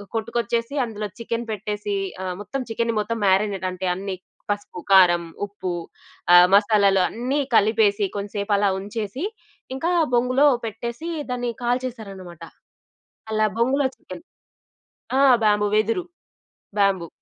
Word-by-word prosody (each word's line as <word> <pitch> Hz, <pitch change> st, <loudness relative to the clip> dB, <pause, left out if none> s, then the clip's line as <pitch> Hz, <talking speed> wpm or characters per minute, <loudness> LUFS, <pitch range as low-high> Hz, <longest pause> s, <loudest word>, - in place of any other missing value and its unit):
కొట్టుకొచ్చేసి 230 Hz, +3 st, -2 dB
అందులో 215 Hz, -2 st, -5 dB
చికెను 230 Hz, 0 st, -3 dB
పెట్టేసి 210 Hz, 0 st, -3 dB, 0.3 s
ఆహ్, 185 Hz, -1 st, -3 dB
మొత్తం 210 Hz, +7 st, -4 dB
చికెన్ని 230 Hz, +1 st, 0 dB
మొత్తం 220 Hz, +2 st, -2 dB
మారినేట్ 195 Hz, 0 st, +1 dB
అంటే 185 Hz, +1 st, -4 dB
అన్ని 195 Hz, +1 st, -4 dB, 0.4 s
పసుపు, 205 Hz, -3 st, -5 dB
కారం, 175 Hz, -3 st, +6 dB, 0.2 s
ఉప్పు 190 Hz, -3 st, -5 dB, 0.6 s
ఆహ్, 175 Hz, 0 st, +9 dB
మసాలాలు 200 Hz, -2 st, +4 dB
అన్ని 255 Hz, +5 st, -2 dB, 0.2 s
కలిపేసి 210 Hz, -1 st, +3 dB
కొంచంసేపు 205 Hz, 0 st, -2 dB
అలా 200 Hz, 0 st, +2 dB
ఉంచేసి 210 Hz, -, -4 dB, 0.5 s
ఇంకా 325 Hz, +7 st, -1 dB, 0.2 s
బొంగులో 255 Hz, +4 st, +3 dB, 0.2 s
పెట్టేసి 235 Hz, +8 st, -5 dB, 0.2 s
దాన్ని 245 Hz, -1 st, -2 dB
కాల్చేసారన్నమాట. 220 Hz, -9 st, -4 dB, 0.9 s
అలా 215 Hz, 0 st, +3 dB
బొంగులో 265 Hz, +4 st, +2 dB
చికెను. -, -, -11 dB, 1.0 s
ఆ! -, -, +5 dB, 0.2 s
బ్యాంబూ 210 Hz, 0 st, +3 dB
వెదురు, 225 Hz, -, +1 dB, 0.7 s
బ్యాంబూ 195 Hz, -4 st, +2 dB
210 Hz, 115 wpm, -23 LUFS, 195-235 Hz, 1.0 s, ఆహ్